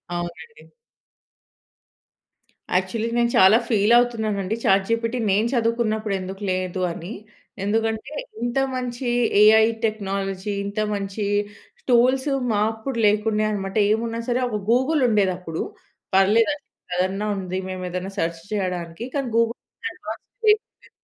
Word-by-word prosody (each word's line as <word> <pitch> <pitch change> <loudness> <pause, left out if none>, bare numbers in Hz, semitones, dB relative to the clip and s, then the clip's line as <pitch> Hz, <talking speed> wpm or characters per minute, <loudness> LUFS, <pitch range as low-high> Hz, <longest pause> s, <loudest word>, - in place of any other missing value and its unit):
అవునండి. 175 - -7 2.1
యాక్చువలీ 215 +5 0
నేను 235 0 +3
చాలా 190 +4 +7
ఫీల్ 215 0 +3
అవుతున్నాను 225 -4 +1
అండి. 210 +4 -1
చాట్‌జిపిటి 230 +3 +2
నేను 210 +4 +2
చదువుకున్నప్పుడు 225 -3 0
ఎందుకు 190 +2 -7
లేదు 185 0 -2
అని. 170 +4 -7 0.5
ఎందుకంటే 220 +4 -1 0.3
ఇంత 240 +2 -1 0.2
మంచి 250 0 -4 0.3
ఏఐ 220 +1 +7 0.2
టెక్నాలజీ. 195 -2 -2
ఇంత 200 +2 -4
మంచి 200 +1 -3 0.6
టూల్స్ 255 +3 +4 0.2
మా 205 - +1
అప్పుడు 235 +3 -5
లేకుండే 210 +1 +2
అనమాట. 195 -1 -4 0.2
ఏమున్నా 230 +1 -1
సరే 245 +1 +1
ఒక 215 - -2
గూగుల్ 260 +5 +3
ఉండేది 200 -4 +3
అప్పుడు. 165 -3 -5 0.5
పర్లేదు 215 +7 +4
అద్ 290 - -17 0.3
అదన్నా 190 +3 0
ఉంది. 185 -1 -4
మేము 185 -1 -5
ఏదైనా 180 +2 -4
సెర్చ్ 165 0 -2
చేయడానికి 180 -1 -3
కానీ 275 -3 -1
గూగుల్ 230 0 +2 0.4
అడ్వాన్స్ - - -8 0.2
పేజ్ 425 0 +5
వుండే. - - -25
215 Hz, 125 wpm, -23 LUFS, 190-235 Hz, 2.1 s, చాలా